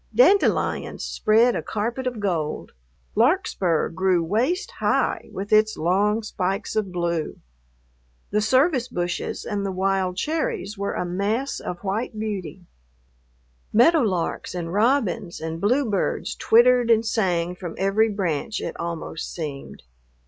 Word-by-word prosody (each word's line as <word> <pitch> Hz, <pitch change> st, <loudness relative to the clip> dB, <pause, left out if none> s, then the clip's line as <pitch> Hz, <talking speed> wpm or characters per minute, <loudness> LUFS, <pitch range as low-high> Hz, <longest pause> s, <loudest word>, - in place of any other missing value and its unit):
Dandelions 410 Hz, -5 st, +3 dB
spread 230 Hz, +3 st, +3 dB
a -, -, -1 dB
carpet 235 Hz, +5 st, -3 dB
of 245 Hz, -3 st, -3 dB
gold. 170 Hz, -7 st, -2 dB, 0.4 s
Larkspur 225 Hz, -, +2 dB
grew 185 Hz, -1 st, +1 dB
waist 245 Hz, -, 0 dB
high -, -, 0 dB
with 200 Hz, +2 st, -4 dB
its 215 Hz, 0 st, +4 dB
long 205 Hz, +6 st, +1 dB
spikes 195 Hz, 0 st, -3 dB
of 210 Hz, -4 st, -1 dB
blue. 170 Hz, -3 st, -2 dB, 0.9 s
The 210 Hz, +1 st, +2 dB
service 260 Hz, +4 st, +2 dB
bushes 175 Hz, -4 st, -3 dB
and 205 Hz, -3 st, -2 dB
the 195 Hz, -, -2 dB
wild 190 Hz, -1 st, 0 dB
cherries 295 Hz, -, -2 dB
were 200 Hz, 0 st, -3 dB
a -, -, -2 dB
mass 205 Hz, +9 st, -1 dB
of 175 Hz, -, -6 dB
white 215 Hz, +4 st, -2 dB
beauty. 195 Hz, -4 st, -5 dB, 1.1 s
Meadowlarks 225 Hz, -, +2 dB
and 170 Hz, -1 st, -4 dB
robins 210 Hz, -5 st, +1 dB
and 160 Hz, +1 st, -5 dB
bluebirds 225 Hz, -2 st, 0 dB
twittered 240 Hz, +1 st, +4 dB
and 225 Hz, 0 st, +4 dB
sang 180 Hz, -6 st, 0 dB
from 175 Hz, -2 st, -7 dB
every 200 Hz, +4 st, +2 dB
branch, 195 Hz, -1 st, -2 dB
it -, -, -5 dB
almost 170 Hz, -1 st, -5 dB
seemed. 150 Hz, -5 st, -7 dB
200 Hz, 125 wpm, -23 LUFS, 180-230 Hz, 1.1 s, its